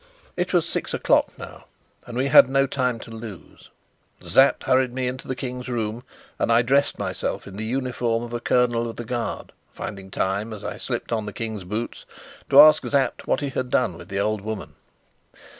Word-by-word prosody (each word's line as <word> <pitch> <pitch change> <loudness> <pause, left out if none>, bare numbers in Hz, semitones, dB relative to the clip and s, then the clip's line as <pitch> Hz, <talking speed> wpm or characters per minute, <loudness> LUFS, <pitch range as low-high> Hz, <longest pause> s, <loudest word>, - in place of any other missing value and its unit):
It 180 +1 -1
was 175 -3 +2
six - - -2
o'clock - - +2
now, - - -10 0.4
and 120 - -6
we 130 - +1
had 135 -1 +7
no 135 0 +3
time 125 -3 -1
to - - -10
lose. 110 -4 -10 0.6
Sapt - - +4
hurried 130 -1 +2
me 130 0 -2
into 125 0 -5
the 130 - -2
King's 125 -1 -5
room, 115 -1 -2 0.4
and - - +1
I 115 +1 +5
dressed 140 +4 +2
myself - - -3
in 100 - -10
the 110 +2 -4
uniform 120 -1 -1
of 120 0 -7
a 120 - -2
colonel 120 -1 +1
of 115 - -7
the 120 - -6
Guard, 120 -1 -4 0.2
finding 95 -2 -7
time 100 +4 -2
as 105 - -9
I - - -5
slipped - - -4
on 110 -2 -1
the 105 - -6
King's 110 -4 -5
boots 110 +5 -5 0.4
to - - +7
ask 155 0 +8
Sapt 140 -2 0
what - - +1
he 140 - -2
had 130 -1 -3
done 120 -8 +1
with - - -11
the 95 0 -2
old 105 0 0
woman. 110 0 -6
120 Hz, 200 wpm, -24 LUFS, 110-130 Hz, 0.6 s, ask